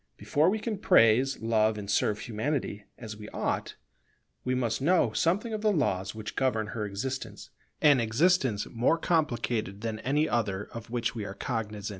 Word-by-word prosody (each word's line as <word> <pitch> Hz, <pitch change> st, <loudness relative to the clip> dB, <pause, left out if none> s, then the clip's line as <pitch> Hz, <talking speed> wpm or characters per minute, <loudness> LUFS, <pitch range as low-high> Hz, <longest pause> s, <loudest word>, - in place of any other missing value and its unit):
Before 155 Hz, +4 st, +2 dB
we 215 Hz, -, +1 dB
can 215 Hz, -2 st, -4 dB
praise, 130 Hz, -, +4 dB
love, 110 Hz, -1 st, +2 dB
and 100 Hz, -1 st, -6 dB
serve 105 Hz, +1 st, +1 dB
Humanity 110 Hz, -2 st, -3 dB
as 110 Hz, -2 st, -7 dB
we 105 Hz, 0 st, -10 dB
ought, -, -, -2 dB, 0.7 s
we 130 Hz, 0 st, 0 dB
must 120 Hz, -1 st, -1 dB
know 145 Hz, -7 st, +3 dB
something 200 Hz, -, +1 dB
of 215 Hz, -, -3 dB
the 215 Hz, -1 st, +3 dB
laws 100 Hz, -, 0 dB
which 105 Hz, -1 st, -7 dB
govern 120 Hz, -5 st, +1 dB
her 105 Hz, -2 st, -3 dB
existence, 130 Hz, +7 st, -5 dB, 0.3 s
an 145 Hz, -3 st, +6 dB
existence 120 Hz, -, +2 dB
more 125 Hz, +8 st, +1 dB
complicated 120 Hz, -, -1 dB
than 110 Hz, -1 st, -3 dB
any 145 Hz, +6 st, +1 dB
other 105 Hz, -4 st, -1 dB
of 115 Hz, 0 st, -8 dB
which 120 Hz, -1 st, -1 dB
we 115 Hz, -4 st, -4 dB
are 100 Hz, -1 st, -6 dB
cognizant. 105 Hz, -4 st, -4 dB
115 Hz, 170 wpm, -28 LUFS, 110-145 Hz, 0.7 s, an